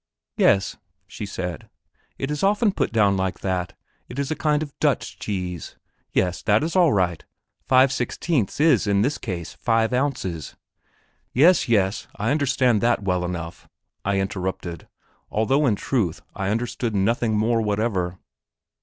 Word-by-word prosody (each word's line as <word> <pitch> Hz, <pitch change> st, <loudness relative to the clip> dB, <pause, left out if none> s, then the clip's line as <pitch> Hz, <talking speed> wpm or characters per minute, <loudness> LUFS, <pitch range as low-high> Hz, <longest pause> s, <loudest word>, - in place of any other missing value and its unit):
"Yes," 100 Hz, -1 st, +3 dB, 0.3 s
she 105 Hz, -, -7 dB
said; 90 Hz, -4 st, -5 dB, 0.5 s
"it 135 Hz, +2 st, -3 dB
is 150 Hz, -, -2 dB
often 205 Hz, +2 st, +3 dB
put -, -, -1 dB
down 105 Hz, -3 st, +3 dB
like 95 Hz, -1 st, -2 dB
that; 90 Hz, -2 st, -2 dB, 0.3 s
it 120 Hz, -, -8 dB
is 140 Hz, +1 st, -2 dB
a -, -, 0 dB
kind 150 Hz, -1 st, +1 dB
of 145 Hz, -3 st, -9 dB
Dutch -, -, 0 dB
cheese. 90 Hz, -4 st, -4 dB, 0.4 s
Yes, 90 Hz, -1 st, 0 dB
that 105 Hz, +5 st, +3 dB
is 165 Hz, +3 st, -2 dB
all 175 Hz, -5 st, +5 dB
right 90 Hz, -, 0 dB, 0.4 s
five 130 Hz, 0 st, +5 dB
sixteenths 130 Hz, -, -1 dB
is 150 Hz, -8 st, +4 dB
in 100 Hz, 0 st, +3 dB
this 140 Hz, +5 st, 0 dB
case 90 Hz, -7 st, -5 dB
five 115 Hz, -1 st, +1 dB
ounces." 125 Hz, -, -2 dB, 0.8 s
"Yes, 160 Hz, +2 st, +5 dB
yes; 100 Hz, -3 st, +1 dB
I 110 Hz, +4 st, -1 dB
understand 130 Hz, -6 st, +2 dB
that 120 Hz, -2 st, +2 dB
well 90 Hz, -2 st, 0 dB
enough," 85 Hz, -1 st, -6 dB, 0.3 s
I 100 Hz, 0 st, +1 dB
interrupted, 95 Hz, -3 st, -4 dB, 0.4 s
although 135 Hz, +7 st, +2 dB
in 110 Hz, -, +3 dB
truth 100 Hz, -, -1 dB
I 100 Hz, -1 st, -2 dB
understood 115 Hz, 0 st, -2 dB
nothing 110 Hz, +2 st, +1 dB
more 115 Hz, +2 st, +2 dB
whatever. 100 Hz, -4 st, -1 dB
110 Hz, 150 wpm, -23 LUFS, 95-135 Hz, 0.8 s, all